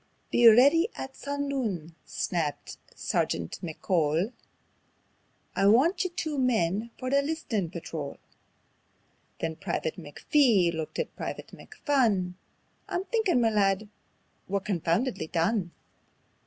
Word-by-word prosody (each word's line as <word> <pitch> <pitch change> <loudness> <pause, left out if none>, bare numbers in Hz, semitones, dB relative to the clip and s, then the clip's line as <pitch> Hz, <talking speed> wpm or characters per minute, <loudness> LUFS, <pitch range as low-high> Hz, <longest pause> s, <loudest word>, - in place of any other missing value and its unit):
"Be 240 - +6
ready 280 - +7
at 265 - -6
sundoon," 270 - -3
snapped 160 -5 -3 0.2
Sergeant 85 0 -1
McCole; 165 - 0 1.2
"I 195 - +3
want 320 - +4
you 370 - -1
two 315 -5 -3
men 220 -4 +1
for 255 0 -4
the 280 0 +4
List'nin' 280 - -2
Patrol." 160 -4 -6 1.2
Then 160 -1 -2
Private 160 - -3
McPhee 185 - +2
looked 160 -1 -5
at 485 - -3
Private - - -6
McPhun: 220 - 0 0.6
"I'm 355 - -1
thinkin', 430 - +2
ma 225 - +4
lad, 205 -1 +1 0.6
we're 200 +1 0
confoundedly 190 - -1
done." 175 +3 0
215 Hz, 110 wpm, -28 LUFS, 170-275 Hz, 1.2 s, ready